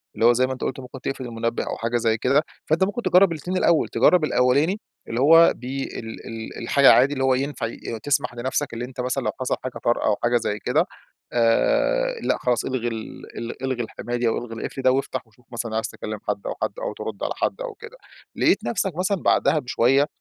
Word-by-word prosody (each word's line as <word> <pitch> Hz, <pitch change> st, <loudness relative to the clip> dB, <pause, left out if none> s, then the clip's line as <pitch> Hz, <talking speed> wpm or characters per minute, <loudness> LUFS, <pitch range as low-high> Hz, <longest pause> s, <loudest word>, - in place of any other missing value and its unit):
اللي 115 Hz, -, +1 dB
هو 120 Hz, -, +7 dB
زي 130 Hz, +2 st, +2 dB
ما 130 Hz, -, -3 dB
أنت 130 Hz, -, -10 dB
قُلت 130 Hz, -, -2 dB
ممكن 130 Hz, 0 st, -10 dB
تقفل 135 Hz, 0 st, -4 dB
المنبه 115 Hz, 0 st, -2 dB
أو -, -, -4 dB
حاجة 115 Hz, +1 st, -1 dB
زي 115 Hz, -1 st, +1 dB
كده، 140 Hz, +6 st, +2 dB, 0.2 s
فأنت 160 Hz, +4 st, +2 dB
ممكن 205 Hz, +5 st, -1 dB
تجرّب 185 Hz, -4 st, +5 dB
الاتنين 175 Hz, +4 st, -3 dB
الأول. 170 Hz, -3 st, +3 dB
تجرّب 180 Hz, -3 st, +4 dB
الأولاني 145 Hz, +8 st, +2 dB, 0.3 s
اللي 115 Hz, -, -3 dB
هو 165 Hz, +4 st, +7 dB
بي 130 Hz, +3 st, -4 dB, 0.2 s
ال 110 Hz, -1 st, -8 dB
ال 115 Hz, -1 st, -7 dB
الحاجة 135 Hz, +4 st, +5 dB
عادي، 135 Hz, +3 st, +5 dB
اللي 135 Hz, -2 st, -2 dB
هو 130 Hz, 0 st, +4 dB
ينفع 135 Hz, -2 st, -2 dB
ي 115 Hz, 0 st, -6 dB
تسمح 145 Hz, -3 st, 0 dB
لنفسك 130 Hz, +3 st, -2 dB
اللي 120 Hz, +1 st, -4 dB
أنت 125 Hz, 0 st, -6 dB
مثلًا 125 Hz, +2 st, -1 dB
لو -, -, 0 dB
حصل 130 Hz, -, 0 dB
حاجة 130 Hz, -1 st, -5 dB
طارئة 120 Hz, -, +1 dB
أو 105 Hz, -, +3 dB
حاجة 120 Hz, 0 st, +3 dB
زي 105 Hz, -2 st, -2 dB
كده، -, -, +1 dB, 0.5 s
آآ 475 Hz, -, +2 dB
لأ -, -, +1 dB
خلاص 120 Hz, -2 st, 0 dB
إلغي 125 Hz, -2 st, -2 dB
ال 115 Hz, -2 st, -7 dB
ال 115 Hz, +2 st, -6 dB
إلغي 130 Hz, -2 st, -1 dB
الحماية 120 Hz, +2 st, -5 dB
دي 120 Hz, -1 st, +1 dB
أو 115 Hz, -, +1 dB
إلغي 120 Hz, -1 st, -6 dB
القفل 130 Hz, +4 st, -5 dB
ده 130 Hz, -, +4 dB
وافتح 130 Hz, -2 st, -2 dB
وشوف 110 Hz, +3 st, -27 dB
مثلًا 115 Hz, -2 st, -4 dB
عايز 110 Hz, 0 st, 0 dB
تكلّم 110 Hz, 0 st, -6 dB
حد 100 Hz, -1 st, -1 dB
أو -, -, -3 dB
حد -, -, 0 dB
أو -, -, -3 dB
ترُد -, -, -6 dB
على -, -, -1 dB
حد -, -, -2 dB
أو -, -, -4 dB
كده. -, -, -12 dB, 0.4 s
لقيت -, -, +2 dB
نفسك 195 Hz, -6 st, -1 dB
مثلُا 190 Hz, +3 st, 0 dB
بعدها 155 Hz, -, +3 dB
بشوية 135 Hz, +2 st, +2 dB
130 Hz, 225 wpm, -23 LUFS, 115-145 Hz, 0.5 s, هو